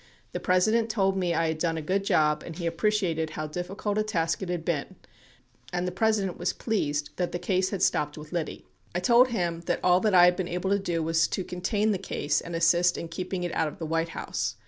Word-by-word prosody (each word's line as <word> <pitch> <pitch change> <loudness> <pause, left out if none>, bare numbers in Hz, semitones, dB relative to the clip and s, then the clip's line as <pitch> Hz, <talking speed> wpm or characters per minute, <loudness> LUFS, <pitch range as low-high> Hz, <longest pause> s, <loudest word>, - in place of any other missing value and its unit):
The - - -3
Presi 185 +3 +3
dent 230 0 +1
told 195 -3 +1
me 180 -3 0
I 165 - +2
had 160 0 -3
done 165 -1 0
a - - -3
good 190 +5 0
job 150 -5 +2
and 165 - -8
he 175 - -4
appreciated 170 -2 0
how 155 0 -4
difficult 190 +6 -3
a - - +2
task 165 -6 -1
it 190 - -4
had 175 -2 -3
been 155 -5 -2 0.8
and 180 0 -1
the - - -2
President 200 -1 0
was 175 - 0
pleased 150 -10 -1
that 180 -1 -1
the - - -2
case 185 +1 0
had 195 -2 -2
stopped 150 0 +1
with 150 0 -10
Liddy... 170 -3 -4 0.3
I - - +2
told 235 +7 +5
him 175 -8 -2
that - - +1
all 180 0 +5
that 210 -1 +2
I 175 -1 +9
had 180 0 +4
been 185 -2 -3
able 180 +2 -2
to 200 - +3
do 170 -4 -1
was 165 0 +2
to 190 - -3
contain 205 +5 0
the 195 - -1
case 150 -6 -1
and 170 - -6
assist 170 +1 +3
in 170 - -5
keeping 180 +1 -4
it 175 - -3
out 160 - +1
of 150 - -7
the 165 - -5
White 165 +1 -1
House. - - -3
180 Hz, 245 wpm, -27 LUFS, 165-195 Hz, 0.8 s, I